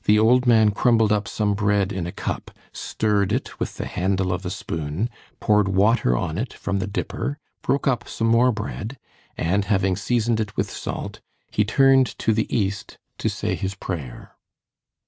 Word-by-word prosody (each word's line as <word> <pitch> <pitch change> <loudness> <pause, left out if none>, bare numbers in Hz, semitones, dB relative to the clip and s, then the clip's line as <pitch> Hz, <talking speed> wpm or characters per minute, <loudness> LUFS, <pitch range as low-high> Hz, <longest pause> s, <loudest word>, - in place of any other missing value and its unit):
The 105 - +5
old 125 +4 +4
man 110 -3 +5
crumbled 110 0 +3
up 105 -1 +1
some 105 -2 0
bread 100 -1 +1
in 90 -3 -3
a - - -4
cup, - - -4 0.2
stirred 105 -3 0
it - - -3
with - - -3
the - - -3
handle 95 0 0
of 90 +2 -4
a 90 - -3
spoon, 80 +6 -3 0.3
poured 105 -2 +3
water 95 - +3
on 80 +8 -2
it 120 +2 -3
from 100 0 -2
the 100 - -2
dipper, 140 +7 -3 0.2
broke 140 - 0
up 130 -3 +1
some 115 - -2
more 115 +2 +4
bread, 110 +3 -5 0.4
and 95 +5 +1
having 95 -3 +2
seasoned 115 +1 0
it 105 -3 -3
with - - -1
salt, - - -5 0.3
he 105 - +2
turned 135 +3 +4
to 110 - +1
the 110 +1 0
east 100 -3 -2 0.2
to - - 0
say - - -2
his 95 +1 -3
prayer. 80 -11 -6
105 Hz, 180 wpm, -23 LUFS, 95-115 Hz, 0.4 s, The